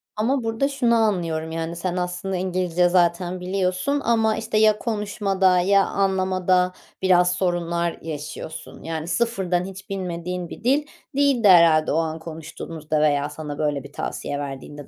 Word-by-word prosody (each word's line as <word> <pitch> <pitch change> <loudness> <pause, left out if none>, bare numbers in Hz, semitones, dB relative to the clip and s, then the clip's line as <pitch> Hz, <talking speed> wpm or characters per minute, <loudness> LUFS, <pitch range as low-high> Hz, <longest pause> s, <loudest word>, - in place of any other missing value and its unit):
Ama 245 +4 0
burada 225 +5 0
şunu 245 -4 +2
anlıyorum, 170 -7 0
yani, 165 +1 -3
sen 180 +1 -3
aslında 180 +2 -3
İngilizce 180 -1 +1
zaten 175 0 +1
biliyorsun 185 +9 -1
ama, 225 -2 +2
işte, 220 -1 -2
ya 215 -1 +5
konuşmada 200 -4 +1
ya 195 +2 +4
anlamada 185 -2 +1 0.3
biraz 180 -1 +4
sorunlar 170 -2 -1
yaşıyorsun, 155 0 -7
yani, 160 0 -4
sıfırdan 180 -2 0
hiç 195 +2 -10
bilmediğin 180 -2 -4
bir - - -10
dil 280 +5 +2 0.3
değildi 275 -6 +3
herhâlde 165 -4 +6
o 155 - +1
an 160 -1 -1
konuştuğunuzda 160 -1 -4
veya 145 -1 +2
sana 150 -1 -7
böyle 145 -3 -1
bir 140 +1 -13
tavsiye 145 0 -4
verdiğinde. 140 0 -7
180 Hz, 145 wpm, -23 LUFS, 165-200 Hz, 0.3 s, herhâlde